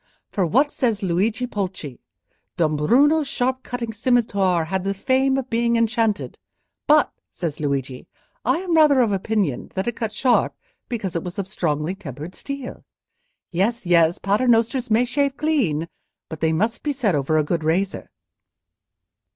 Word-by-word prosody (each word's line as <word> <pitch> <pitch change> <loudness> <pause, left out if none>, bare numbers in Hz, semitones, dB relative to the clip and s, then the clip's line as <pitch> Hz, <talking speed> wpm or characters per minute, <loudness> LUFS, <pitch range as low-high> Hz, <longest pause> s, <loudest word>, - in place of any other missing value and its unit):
For 190 -5 0
what 275 - +3
says 225 -6 -1
Luigi 205 +7 0
Pulci? 185 - -5 0.6
'Dombruno's 240 - +3
sharp 260 0 -1
cutting 240 -3 -5
scimitar 200 -7 +1
had 190 +3 -2
the 195 +1 -1
fame 265 +5 +2
of 270 -1 -3
being 235 +1 +2
enchanted; 230 -2 0 0.5
but,' 300 0 +4 0.2
says 160 -4 -5
Luigi, 140 -3 -3 0.4
'I - - +2
am 365 -3 -2
rather 300 -4 +6
of 230 -4 +2
opinion 195 - -1
that 190 - -1
it 240 - -1
cut 225 -2 -3
sharp 255 +1 +2 0.3
because 210 -8 -3
it 170 - 0
was 180 +2 -7
of 195 -2 -3
strongly 160 -4 -1
tempered 160 -3 -8
steel.' 275 +2 -7 0.7
Yes, 200 +6 0
yes; 170 -1 +4
Paternosters 235 +4 +1
may 225 +3 +3
shave 275 +2 0
clean, 225 - 0 0.4
but 160 - -7
they 160 0 +1
must 215 +9 0
be 295 - -1
said 240 -8 0
over 145 +2 +1
a 155 - +3
good 160 +2 -2
razor." 185 +5 -1
210 Hz, 150 wpm, -22 LUFS, 170-250 Hz, 0.7 s, rather